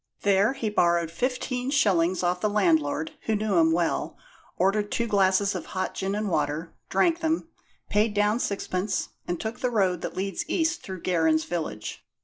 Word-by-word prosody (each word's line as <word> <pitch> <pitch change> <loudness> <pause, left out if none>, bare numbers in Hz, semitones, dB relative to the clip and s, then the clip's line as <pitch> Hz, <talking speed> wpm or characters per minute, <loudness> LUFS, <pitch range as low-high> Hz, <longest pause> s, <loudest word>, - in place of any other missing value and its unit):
There 200 +4 +3
he 230 -6 -3
borrowed 170 -4 +2
fifteen 250 +5 -2
shillings 185 - +2
off 180 0 0
the 215 - +2
landlord, 160 -6 +1 0.2
who 220 - +2
knew 210 -3 0
him 160 -1 +5
well; 170 0 0 0.4
ordered 205 +3 +1
two 235 - 0
glasses 200 -2 +3
of - - -5
hot 185 - -1
gin 195 +1 -2
and 210 0 -1
water, 155 -1 -1 0.2
drank 340 -1 +2
them, 320 0 -1 0.4
paid 210 +1 +1
down 210 +2 +2
sixpence, 195 -3 -2 0.2
and 175 -1 -2
took 225 +2 -4
the 250 - 0
road 190 -7 +1
that - - -5
leads 195 +1 -2
east 330 +1 +1
through 185 -2 -8
Gerrans 160 -3 +2
village. 130 -12 -4
195 Hz, 170 wpm, -26 LUFS, 170-220 Hz, 0.4 s, him